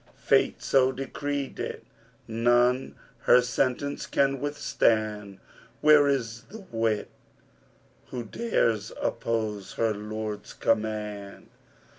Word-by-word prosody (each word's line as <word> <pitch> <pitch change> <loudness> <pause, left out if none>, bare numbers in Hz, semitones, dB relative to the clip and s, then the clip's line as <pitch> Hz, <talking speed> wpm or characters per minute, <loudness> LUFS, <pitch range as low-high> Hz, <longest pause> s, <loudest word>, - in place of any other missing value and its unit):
Fate - - +2
so 130 -1 +4
decreed 140 +1 -4
it! - - -4 0.4
None 120 +3 +2 0.3
her 125 - +7
sentence 130 +3 -1
can 135 -1 +1
withstand: 110 -8 0 0.2
* 115 +1 -27
Where 150 -1 +7
is 115 -5 -1
the 220 +2 -9
wight 115 -2 0 1.0
who 125 -2 -5
dares 115 - 0
oppose 110 -3 -2
his 115 -2 +1
Lord's 105 0 -5
command?' 105 -2 -2
115 Hz, 100 wpm, -27 LUFS, 110-135 Hz, 1.0 s, her